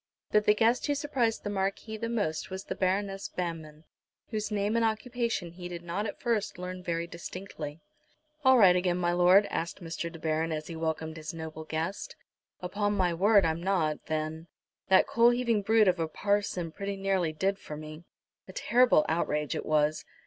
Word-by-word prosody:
But 210 0 +3
the 210 - +5
guest 230 +5 +2
who 290 - +1
surprised 270 -6 0
the - - -3
Marquis 195 +3 -2
the 230 +1 -4
most, 205 -9 -2
was 190 0 -5
the - - -4
Baroness 195 +1 -1
Banmann, 160 -3 -5 0.5
whose 215 -2 -2
name 210 +1 0
and 230 - +2
occupation 225 -4 -1
he 175 +1 -8
did 175 -1 -7
not 180 +5 -2
at - - -7
first 230 -7 -1
learn 180 0 -6
very 170 -1 -2
distinctly. 170 -2 -7 0.6
"All 260 -1 +7
right 190 -6 +7
again, 180 -1 +1
my 175 -1 +1
lord?" 180 +3 +6
asked 170 +1 -3
Mr. 170 0 -5
De 165 - -9
Baron, 160 +1 -1
as 155 -1 -3
he 165 - -7
welcomed 160 0 -3
his 155 +1 -6
noble 160 -1 -7
guest. 165 - -4 0.5
"Upon 205 +3 -1
my 180 -3 +2
word 200 +2 +4
I'm 160 +1 0
not, 175 -5 0
then. 155 +1 -3 0.4
That 190 0 +6
coal 235 +1 +4
heaving 240 -3 +1
brute 220 +1 +4
of 180 -1 +3
a 165 - 0
parson 195 -1 -1
pretty 200 +3 -4
nearly 195 -4 0
did 195 +5 -1
for 150 - -8
me." 155 +1 -9 0.4
"A 185 - -11
terrible 240 -8 +4
outrage 150 -2 0
it - - -4
was." 155 0 +2
180 Hz, 185 wpm, -29 LUFS, 160-210 Hz, 0.6 s, All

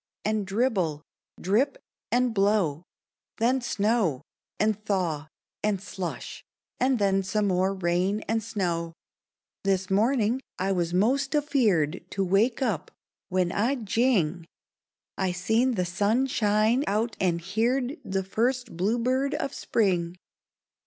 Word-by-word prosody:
And 215 -2 0
dribble! 195 - 0 0.4
drip! 215 +10 +1 0.3
and 245 -1 +2
blow! 195 -7 +2 0.6
Then 250 +3 +2
snow! 210 - 0 0.4
and 215 0 +1
thaw! 175 -8 -1 0.4
and 210 -2 +1
slush! 190 -2 -6 0.4
and 255 0 +3
then 195 -2 +2
Some 210 +2 0
more 190 +1 +1
rain 185 +3 0
and 225 +1 -1
snow! 175 -7 -2 0.7
This 190 -1 0
morning 230 +3 +2 0.2
I 190 +1 0
was 175 -3 0
'most 265 - +1
afeared 215 - +1
To 195 0 -1
wake 220 +8 +2
up 205 - -1 0.4
when, 180 -1 +1
I 235 +7 +1
jing! 200 - +1 0.7
I 190 -1 +1
seen 225 +7 +1
the 180 -3 0
sun 205 +8 +1
shine 220 +1 +2
out 220 +3 0
and 175 -3 +1
heerd 240 - -1
The 190 0 -2
first 235 +3 -1
bluebird 240 +9 +1
of - - -3
spring! 180 -6 0
205 Hz, 125 wpm, -27 LUFS, 185-235 Hz, 0.7 s, and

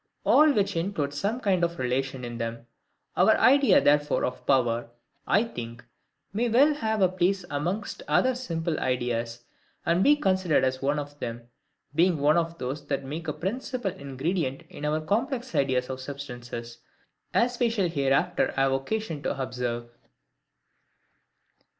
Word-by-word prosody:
All 305 0 +6
which 205 -9 +1
include 165 -5 -1
some 205 - -1
kind 190 -7 +1
of 170 0 0
relation 130 0 -2
in 120 0 -6
them. 115 0 -4 0.5
Our - - +5
idea 275 +1 +6
therefore 145 0 +3
of 125 - -6
power, 120 -3 +2 0.4
I 210 - +4
think, 120 - -7 0.5
may 235 +4 0
well 275 +7 +5
have 220 -7 0
a - - +6
place 185 +1 0
amongst 175 +9 -3
other 260 0 +3
SIMPLE 165 -10 -3
IDEAS, 120 -2 -2 0.4
and 170 +3 +3
be 295 - +6
considered 185 - +2
as 130 0 0
one 140 +2 +1
of 145 0 -6
them; 115 0 -5 0.5
being 170 +2 +3
one 145 +2 +3
of 165 0 -1
those 135 +2 -5
that 140 -1 -1
make 155 +5 -6
a 150 - -1
principal 220 - -3
ingredient 140 0 -3
in 150 - -6
our 155 +1 0
complex 240 - -1
ideas 130 -2 +1
of 130 0 -5
substances, 120 -4 -7 0.5
as 245 +1 +1
we 240 - +3
shall 205 -5 +1
hereafter 140 -4 +1
have 135 0 +2
occasion 160 +4 -2
to 140 - -3
observe. 120 -2 -3
150 Hz, 150 wpm, -27 LUFS, 130-195 Hz, 0.5 s, All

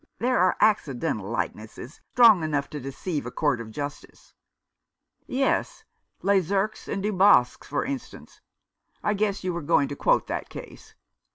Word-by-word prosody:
There 250 +2 +1
are 185 0 +3
accidental 130 - +1
likenesses 115 +3 -5
strong 230 -7 +7
enough 150 -3 -2
to 150 - -5
deceive 140 +4 -4
a - - -6
court 145 -6 0
of 115 - -8
justice." 145 +5 -8 0.9
"Yes, 270 +1 0 0.4
Lesurques 195 +2 +1
and 195 -1 -3
Dubosc, 200 -10 +4
for 145 - -2
instance 275 -1 -7 0.3
— - - -44
I 210 - +1
guess 200 -1 -1
you 180 -1 -1
were 170 - -3
going 145 -1 +2
to 145 - -5
quote - - +2
that - - -4
case. - - -11
175 Hz, 150 wpm, -25 LUFS, 140-205 Hz, 0.9 s, strong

